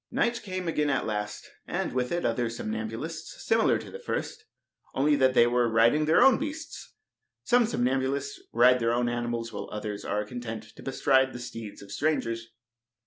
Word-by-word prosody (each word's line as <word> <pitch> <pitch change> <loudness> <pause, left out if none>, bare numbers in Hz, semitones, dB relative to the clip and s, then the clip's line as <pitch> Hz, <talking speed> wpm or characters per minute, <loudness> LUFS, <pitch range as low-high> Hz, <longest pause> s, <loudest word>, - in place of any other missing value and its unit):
Night 235 0 0
came 185 -3 -4
again 150 -3 +1
at 140 - 0
last, 105 -1 -4 0.2
and - - -2
with 125 -1 -1
it 175 0 -1
other 120 0 0
somnambulists 115 +8 -5
similar 225 0 +3
to - - -9
the 475 - -8
first, 440 -2 -4 0.5
only 145 +2 +3
that 130 -2 +3
they 120 - +7
were 120 0 +2
riding 115 +6 +4
on - - +1
their 160 - +6
own 265 -4 +6
beasts. 310 +2 -6 0.5
Some 245 -2 +4
somnambulists 135 - -1
ride 125 +2 +5
their 115 0 +1
own 120 0 +1
animals, 120 -1 -2
while - - -6
others 105 -1 -5
are 105 0 -1
content 115 -1 -6
to - - -12
bestride 130 0 +2
the 125 - -6
steeds 115 -4 -8
of 100 - -13
strangers. 115 -5 -1
125 Hz, 180 wpm, -28 LUFS, 115-155 Hz, 0.5 s, they